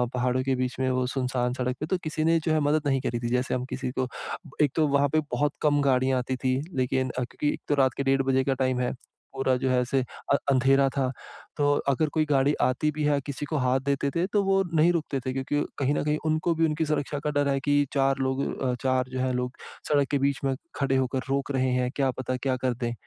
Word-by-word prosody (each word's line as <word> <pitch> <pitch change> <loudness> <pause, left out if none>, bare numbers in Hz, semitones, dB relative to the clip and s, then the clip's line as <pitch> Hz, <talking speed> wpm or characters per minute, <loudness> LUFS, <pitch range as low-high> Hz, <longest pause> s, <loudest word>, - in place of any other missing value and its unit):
पहाड़ों 125 +1 +1
के 135 0 +1
बीच 130 0 -2
में 130 0 +1
वो 130 0 +1
सुनसान 125 -2 0
सड़क 125 0 -2
पे 155 - -2
तो, 185 +4 0
किसी 155 0 -2
ने 165 +1 +3
जो 160 - +2
है 155 - +3
मदद 150 0 +1
नहीं 135 -1 +1
करी 120 -2 -2
थी। 120 0 -3
जैसे 125 +1 0
हम 125 0 -2
किसी 130 -1 -3
को 130 - +1 0.5
एक 145 -3 +3
तो, 155 -2 +3
वहाँ 140 0 +2
पे 155 - +2
बहुत 145 0 +1
कम 145 -1 +3
गाड़ियाँ 130 -1 +2
आती 130 +1 -2
थीं। 130 +1 +2 0.2
लेकिन 130 0 +1
अ, 125 +1 -2
क्योंकि 145 +4 -2
एक - - -8
तो 145 - +3
रात 130 -3 +3
के 140 - 0
डेढ़ 135 0 +2
बजे 130 0 +3
का 135 - +1
टाइम 130 -1 0
है, 125 - -1 0.4
पूरा 135 -1 +1
जो 130 +1 -1
है 130 0 +3
ऐसे 130 +2 0 0.3
अ - - +6 0.2
अंधेरा 135 +1 +4
था। 130 -1 -1 0.5
तो 145 -1 +3 0.2
अगर 150 +3 +1
कोई 155 -1 +2
गाड़ी 140 -1 +2
आती 130 +4 +1
भी 150 0 -3
है, 145 -1 +3
किसी 140 +1 -5
को 155 +1 -2
हाथ 130 -1 +2
देते 140 0 0
थे, 170 +1 +2
तो 205 0 +1
वो 195 0 +3
नहीं 160 +2 +5
रुकते 155 -5 -1
थे। 130 - -1
क्योंकि 135 +2 -1 0.2
कहीं 140 +1 +1
न - - 0
कहीं 150 0 +1
उनको 155 +2 +1
भी 165 0 +3
उनकी 160 0 0
सुरक्षा 145 -1 -1
का - - +2
डर 145 -1 +1
है 135 0 +1
कि 145 0 +2
4 135 -1 +2
लोग 130 0 0 0.2
अ, 125 -1 +1
4 130 -1 +1
जो 130 0 -4
हैं 130 0 0
लोग 125 +1 -3 0.3
सड़क 145 -2 +3
के 145 - +3
बीच 140 0 +1
में 135 -1 +1 0.2
खड़े 135 -1 +1
होकर 130 0 0
रोक 140 +1 -1
रहे 130 -1 +1
हैं, 125 0 0
क्या 135 -2 +2
पता, 130 0 -2
क्या 130 0 -1
कर 130 -1 +2
दें। 120 -1 -3
135 Hz, 260 wpm, -26 LUFS, 130-145 Hz, 0.5 s, अ